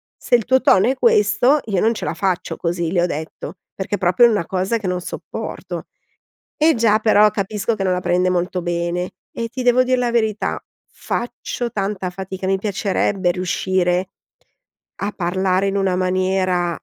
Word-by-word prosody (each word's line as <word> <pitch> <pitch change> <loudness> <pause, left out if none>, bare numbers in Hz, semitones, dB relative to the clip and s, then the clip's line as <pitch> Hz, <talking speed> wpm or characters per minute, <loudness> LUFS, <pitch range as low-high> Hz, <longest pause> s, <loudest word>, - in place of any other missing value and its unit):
se 250 - +1
il 230 -4 +1
tuo 260 +1 +3
tono 190 - +4
è 260 - +1
questo, 235 +3 +3
io 195 -5 0
non 225 +1 +3
ce 220 - -5
la - - -2
faccio 190 -3 -1
così", 170 -1 -2
le 175 - +3
ho - - +3
detto, 160 +1 -6 0.2
perché 195 +1 -3
è - - -4
proprio 185 +5 +4
una 205 -7 0
cosa 190 +6 -1
che 210 -4 -5
non 180 0 -1
sopporto. - - -6 0.7
E 315 +1 +4
già, 220 -2 +3
però 215 -1 +5
capisco 205 +3 -2
che 205 - -4
non 185 -1 +1
la 180 - 0
prende 180 +1 +1
molto 180 0 -1
bene 175 +1 -2 0.2
e 230 0 -4
ti 255 +2 -5
devo 250 +1 +4
dire 255 0 +1
la 245 -1 +1
verità 220 -3 0 0.3
faccio 240 0 -4
tanta 195 -2 -2
fatica, 190 +1 -6
mi 195 0 +2
piacerebbe 195 -2 0
riuscire 180 0 0 0.9
a 205 +1 -1
parlare 185 +1 0
in 195 - -1
una 190 -2 +1
maniera, 185 -1 0
190 Hz, 180 wpm, -20 LUFS, 180-220 Hz, 0.9 s, però